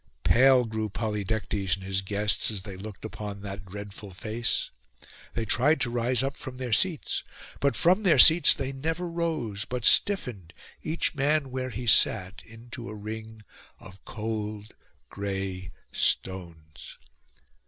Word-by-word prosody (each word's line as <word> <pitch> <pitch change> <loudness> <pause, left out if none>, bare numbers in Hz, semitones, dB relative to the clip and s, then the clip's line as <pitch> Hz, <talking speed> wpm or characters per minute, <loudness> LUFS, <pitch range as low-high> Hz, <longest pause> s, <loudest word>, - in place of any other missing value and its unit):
Pale 130 0 +5
grew 110 -1 -3
Polydectes 105 -2 -2
and 95 - -12
his 95 0 -1
guests 105 +2 0
as 105 -4 -4
they 100 -3 -8
looked 100 +2 -9
upon 105 -2 -7
that 100 0 -7
dreadful 100 +1 -8
face. 110 +5 -2 0.6
They 115 - -1
tried 135 +9 +3
to 120 - 0
rise 120 +1 +1
up 135 +1 -3
from 130 -2 -8
their 125 -3 -3
seats: 170 +3 0 0.4
but 140 0 +1
from 185 +5 +3
their 185 -6 +4
seats 160 -1 +8
they 135 -1 -3
never 160 +6 -3
rose, 160 -12 -2
but 125 -1 -4
stiffened, 115 - +3 0.3
each 160 +2 -1
man 145 -1 0
where 130 0 -3
he 120 +1 -6
sat, 95 -4 +3
into 115 +1 -9
a 110 - -7
ring 110 +1 -8 0.4
of 95 +1 -14
cold 110 -1 -5 0.4
gray 95 -2 -4 0.2
stones. 85 -5 -2
110 Hz, 145 wpm, -27 LUFS, 100-130 Hz, 0.6 s, seats